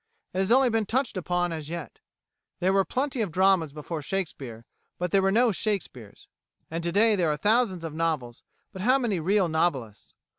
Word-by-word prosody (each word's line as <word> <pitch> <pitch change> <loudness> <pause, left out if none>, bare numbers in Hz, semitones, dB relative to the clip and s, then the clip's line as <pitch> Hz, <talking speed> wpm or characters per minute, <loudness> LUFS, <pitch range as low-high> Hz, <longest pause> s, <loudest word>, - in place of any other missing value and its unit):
It 185 - -2
has 190 +3 0
only 260 0 +5
been 220 -2 0
touched 250 0 0
upon 175 -1 -1
as 155 -2 -6
yet. 170 -2 -7 0.6
There 185 +2 +2
were 195 0 +4
plenty 260 +2 -2
of 200 -6 -2
dramas 185 -3 +3
before 155 +2 -6
Shakespeare 135 -9 -5 0.3
but 180 -1 -2
there 195 - +4
were 195 0 +2
no 235 +3 +4
Shakespeares; 175 - -4 0.4
and 165 +1 -3
to 170 - 0
day 215 +3 +4
there 175 -5 +1
are 150 - 0
thousands 210 -3 +1
of 160 -2 -5
novels 155 -7 -2 0.3
but 190 - -8
how 255 +6 +4
many 230 -9 -1
real 190 +3 +2
novelists? 145 -10 -2
180 Hz, 190 wpm, -26 LUFS, 160-210 Hz, 0.6 s, only